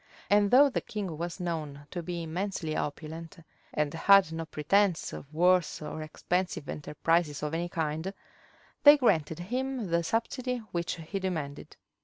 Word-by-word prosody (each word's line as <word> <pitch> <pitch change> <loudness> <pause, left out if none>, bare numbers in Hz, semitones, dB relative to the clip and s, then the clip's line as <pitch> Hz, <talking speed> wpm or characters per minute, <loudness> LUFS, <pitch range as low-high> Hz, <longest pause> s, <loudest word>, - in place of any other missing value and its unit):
And 205 0 +5
though 270 +5 +7
the 270 - -2
king 195 -6 -5
was 170 +2 -5
known 155 -5 -4
to 175 - -3
be 170 0 -4
immensely 165 -1 -3
opulent, 160 +2 -5 0.3
and 150 0 -1
had 190 +1 +5
no 165 0 -4
pretence 175 +5 +1
of 140 - -9
wars 180 +2 +3
or 155 +1 -6
expensive 175 +2 -2
enterprises 150 0 0
of 150 +1 -2
any 170 +1 -1
kind, 160 +2 -2 0.7
they 290 0 +9
granted 165 - +2
him 245 +2 -3
the 170 0 +3
subsidy 245 +7 -1
which 170 -2 -2
he 170 +4 -5
demanded. 155 -7 -4
170 Hz, 150 wpm, -29 LUFS, 155-195 Hz, 0.7 s, they